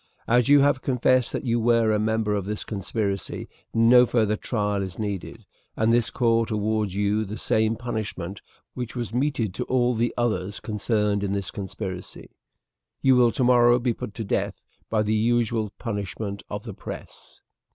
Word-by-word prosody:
As 125 +2 +3
you 145 0 +7
have 140 -1 +3
confessed 130 -1 +2
that - - -4
you 120 -1 +1
were 115 -1 +3
a 105 - +2
member 110 0 0
of 100 -2 -1
this 105 0 -3
conspiracy, 100 -1 -3 0.2
no 120 +2 +6
further 110 -3 +2
trial 105 -2 -1
is 95 -2 -5
needed, 100 -4 -5 0.3
and 110 +1 +3
this 120 -2 +3
court 115 -1 +1
awards 105 -2 0
to 100 - -3
you 105 +1 +1
the 105 +1 -6
same 110 0 +1
punishment 100 -6 -5 0.3
which 125 -1 -5
was 120 -4 -4
meted 125 -6 0
to - - -3
all 125 -1 +2
the 120 +1 0
others 105 -4 -1
concerned 105 -1 0
in 100 0 -1
the 100 -1 -1
conspiracy 95 -2 -7 0.7
you 130 -1 +6
will 120 -2 +5
tomorrow 120 -1 +4
be 125 -1 0
put 105 - -7
to 115 - -4
death 100 - -2 0.3
by 110 -1 +2
the 105 +1 0
usual 115 -1 +1
punishment 100 -2 -4
of - - -5
the - - -7
press." - - -10
110 Hz, 170 wpm, -25 LUFS, 105-120 Hz, 0.7 s, you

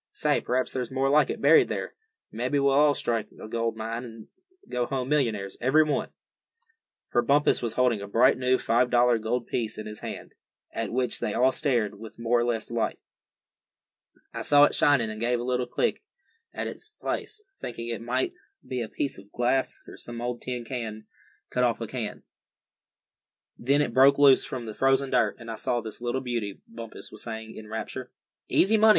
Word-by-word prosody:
Say, - - +1
p'raps 130 +1 -1
there's 125 -2 -2
more 135 +1 +1
like 150 -1 +4
it - - -4
buried 150 +3 +6
there. - - -3 0.4
Mebbe 125 +5 -3
we'll 140 +1 +4
strike 115 -4 -1
a - - -8
gold 115 0 -1
mine, 115 +2 -4
and 115 -2 -10 0.4
go 120 -1 -1
home 130 -1 -2
millionaires, 110 -10 0
every 135 +6 +5
one." 150 -2 -1 1.0
For 120 - +1
Bumpus 140 +5 +3
was 115 -2 -3
holding 125 -5 +2
a 100 - -6
bright 120 +6 +4
new 130 0 +2
five 120 +1 +2
dollar 120 -1 +4
gold 115 +2 -1
piece 110 -3 -2
in 110 - -6
his 105 0 -7
hand, - - -7 0.4
at 115 - -3
which 125 0 0
they 105 - -2
all 130 +3 +4
stared 120 -9 0
with 110 0 -10
more 115 +1 +2
or - - +2
less 120 -2 -1
delight. 115 -1 -2 1.4
"I - - -4
saw 145 0 +6
it - - +5
shinin' 125 -7 +3
and 110 - -7
gave 120 +1 +1
a - - -3
little 125 0 0
kick 475 - 0 0.5
at - - -4
the - - -6 0.2
place, 430 0 -4 0.2
thinkin' 115 -1 -6
it 115 - -5
might 125 +3 -1 0.3
be 130 -1 -2
a 110 - -4
piece 140 -8 -3
of 100 +1 -17
glass, 125 +2 0
or - - -11
some 120 0 -7
old 120 0 -3
tin 125 -2 -4 0.9
cut - - +1
off - - +2
a - - -3
can. - - -5 1.3
Then 140 +4 +2
it 115 - -3
broke 135 +2 +6
loose 140 -2 +6
from 125 -3 -5
the 110 - -6
frozen 135 +2 +2
dirt, 110 -3 +2
and 115 -1 -8
I 110 - -5
saw 120 +2 0
this 110 0 -7
little 120 +2 -1
beauty," 115 -6 -3
Bumpus 115 -1 -9
was 110 - -9
saying, 110 -1 -7
in 110 - -9
rapture. 110 +3 -5 0.4
"Easy 215 +4 +4
money!" 220 +1 +7
120 Hz, 195 wpm, -27 LUFS, 115-130 Hz, 1.4 s, money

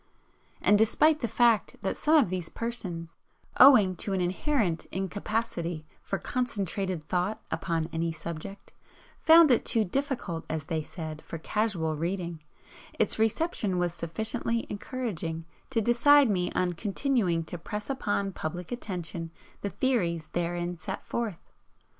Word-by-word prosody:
And 205 0 +5
despite 300 +8 +4
the 235 - -1
fact 230 -3 +3
that 190 - -1
some 310 +1 +3
of 245 - +3
these 180 -3 -3
persons, 185 -8 -5 0.4
owing 215 -9 +8
to 200 - -2
an 190 - +1
inherent 185 - 0
incapacity 190 -4 -3 0.2
for 195 - -2
concentrated 195 -9 -2
thought 180 +6 -1
upon 165 -3 -1
any 165 0 0
subject, 170 +5 -8 0.5
found 320 -2 +7
it 245 - +4
too 225 -2 +2
'difficult' 240 - -2
as 155 -2 -3
they 160 -1 -1
said, 155 -1 -7
for 165 - -7
casual 170 -3 -1
reading, 170 0 -3 0.6
its - - +1
reception 220 - +1
was 175 -1 0
sufficiently 220 +7 -2
encouraging 195 -8 -4 0.2
to 240 -4 +1
decide 245 +3 +5
me 180 -2 0
on 180 -1 +1
continuing 200 - 0
to 170 +1 -6
press 210 +4 -5
upon 205 -7 -1
public 175 0 -5
attention 175 -8 -4 0.3
the 200 - -2
theories 175 -8 0
therein 175 0 -2
set 190 +4 -5
forth. 225 -7 -4
190 Hz, 135 wpm, -28 LUFS, 170-230 Hz, 0.6 s, owing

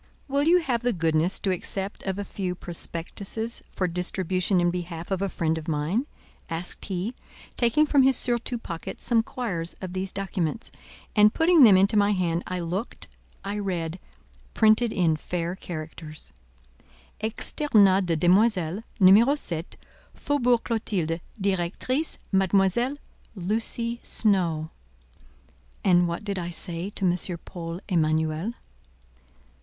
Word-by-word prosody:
"Will 280 +1 +1
you 335 +5 +5
have 245 -7 -1
the 245 0 +1
goodness 165 0 +1
to 195 - +1
accept 195 +2 -4
of 190 0 -1
a 205 - -2
few 185 -2 -3
prospectuses 190 +6 -2
for 185 - -1
distribution 180 +1 0
in 175 0 +2
behalf 175 0 -6
of 190 -1 0
a 195 - 0
friend 160 -2 -1
of 160 - -11
mine?" 165 - 0 0.4
asked 165 +1 -5
he, 195 +4 -3 0.4
taking 240 +6 +3
from 290 -2 +4
his 265 0 +5
surtout 240 -1 -1
pocket 170 -2 -6
some 235 -2 +3
quires 205 -10 -4
of 185 -1 -6
these 190 0 -3
documents, 190 -1 -3 0.4
and 210 0 +5
putting 330 0 +5
them 210 -7 +9
into 195 +3 +3
my 205 0 +4
hand. 175 -3 0
I 185 0 -3
looked, 180 +7 -4 0.3
I 205 +1 -3
read—printed 200 +5 -1
in 165 -6 +2
fair 175 +2 -3
characters:— 155 - -7 0.9
"Externat 210 -4 +2
de 165 - +2
demoiselles. 180 +1 +3 0.2
Numéro 215 +9 +6
7, 165 - -5 0.4
Faubourg 250 -5 +1
Clotilde, 190 -8 -1 0.2
Directrice, 200 - -1
Mademoiselle 195 +7 +2 0.4
Lucy 230 +5 -2
Snowe." 170 -7 0 1.1
And 175 -2 +4
what 170 +5 -4
did 200 -2 -3
I 175 -1 -4
say 175 +1 -3
to 200 -1 -3
M. 175 0 0
Paul 170 -1 -6
Emanuel? 160 +3 0
190 Hz, 130 wpm, -26 LUFS, 170-220 Hz, 1.1 s, them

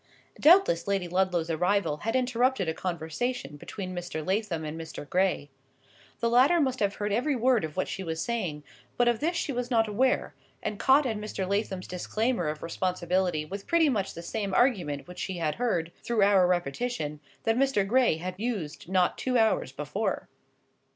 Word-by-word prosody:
Doubtless 330 - +5
Lady 195 -3 0
Ludlow's 175 -2 0
arrival 180 -1 +1
had 225 +8 -2
interrupted 250 -4 +1
a 160 - 0
conversation 170 - -3
between 185 +5 -7
Mr. 175 -3 -5
Lathom 190 -5 -1
and 155 +1 -5
Mr. 160 -2 -7
Gray. 180 -6 0 0.7
The 235 - +2
latter 265 +8 +5
must 260 -4 +1
have 200 -1 +1
heard 205 -1 -2
every 270 +6 +1
word 245 -3 +3
of 155 +2 -5
what 185 - 0
she 190 - -4
was 160 -2 -4
saying; 180 -11 -2 0.3
but 245 - +3
of 240 -2 +2
this 335 +3 0
she 330 - -1
was 245 -1 -3
not 225 -3 +3
aware, 250 +5 +1 0.3
and 210 - -3
caught 275 +2 +5
at 225 -4 -1
Mr. 210 -3 -4
Lathom's 200 -2 -1
disclaimer 215 +2 -1
of 150 0 -4
responsibility 180 -1 0
with 195 +5 -7
pretty 335 -2 +4
much 200 -7 -1
the 170 - -7
same 200 0 -3
argument 175 - +1
which 180 - -10
she 190 -2 -3
had 155 -3 0
heard 170 -9 0
(through 230 -4 +2
our 195 -2 +5
repetition) 175 - -2 0.2
that 225 - +2
Mr. 260 -6 +2
Gray 245 -6 +3
had 180 +3 -4
used 190 -10 -4
not 185 -1 +2
two 255 -1 +1
hours 220 -1 +2
before. - - -3
195 Hz, 180 wpm, -28 LUFS, 170-240 Hz, 0.7 s, Doubtless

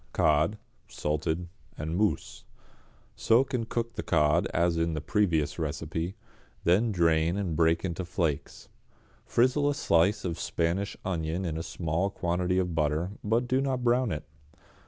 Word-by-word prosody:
=Cod, 80 +7 +2 0.3
Salted, 80 +3 -2 0.3
en 80 +2 -3
Mousse.= 105 +2 -1 0.7
Soak 130 +5 +3
and 115 -3 -1
cook 115 0 -2
the 110 - -4
cod 75 0 +2
as 85 +1 +1
in 85 0 0
the - - -1
previous 80 -4 0
recipe, 80 +3 -3 0.5
then 105 +7 +3
drain 85 -1 +2
and 95 -6 -2
break 80 +2 +2
into 90 0 -3
flakes. 85 -4 -3 0.6
Frizzle 130 +4 +3
a 145 - 0
slice 95 -1 +2
of 85 -3 -2
a - - -6
Spanish 85 +5 -1
onion 85 0 -2
in 80 -3 -2
a 80 - -3
small 85 +2 -1
quantity 90 0 -1
of 90 -2 0
butter, 80 +3 0
but 115 +4 +1
do 130 +2 +2
not 130 -2 -1
brown 120 -1 +2
it. 75 - -3
85 Hz, 155 wpm, -28 LUFS, 80-105 Hz, 0.7 s, Soak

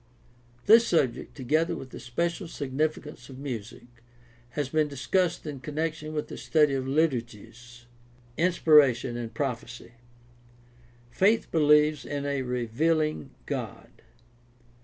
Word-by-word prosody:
This 230 +2 +7
subject, 135 -6 0
together 155 +5 +1
with 130 - -9
the - - -8
special 170 +9 -2
significance 150 -2 -3
of 130 - -10
music, 120 -4 -7 0.7
has 145 -3 0
been 155 +2 +1
discussed 165 +7 -1
in 145 -3 -6
connection 155 +3 -4
with 150 - -2
the - - -8
study 150 -3 +2
of 130 -1 -2
liturgies. 120 -4 -3 0.5
Inspiration 150 -8 +4
and 120 -1 -5
prophecy. 120 -2 -5 0.6
— 120 0 -29 0.3
Faith 215 - +2
believes 150 -1 +4
in 145 -1 -4
a 140 -1 -1
revealing 125 - -1
God. - - -5
145 Hz, 115 wpm, -27 LUFS, 120-155 Hz, 0.7 s, This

